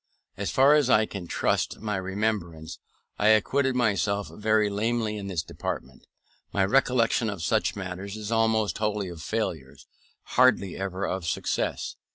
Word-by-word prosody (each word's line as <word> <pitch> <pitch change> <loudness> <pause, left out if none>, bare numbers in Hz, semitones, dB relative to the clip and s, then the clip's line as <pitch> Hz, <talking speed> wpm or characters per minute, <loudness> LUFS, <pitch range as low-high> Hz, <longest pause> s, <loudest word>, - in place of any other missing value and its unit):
As - - -3
far 135 +2 +5
as 150 -4 +3
I 110 -3 +5
can 100 -5 -7
trust - - 0
my 105 -2 -2
remembrance, 95 -4 -3 0.4
I 105 - +3
acquitted 125 +5 +3
myself 100 -4 +1
very 110 0 +2
lamely 110 +1 -1
in 100 -2 -5
this 90 -4 -2
department; 65 -3 -6 0.4
my 95 - +2
recollection 115 0 +2
of 100 -5 -5
such 110 +4 +1
matters 95 +1 -6
is 105 0 -6
almost 110 -4 +1
wholly 105 -3 -1
of 85 -2 -9
failures, 75 - -4 0.4
hardly 125 -7 +3
ever 95 0 -3
of 90 -2 -3
success. - - -2
105 Hz, 150 wpm, -26 LUFS, 95-110 Hz, 0.4 s, far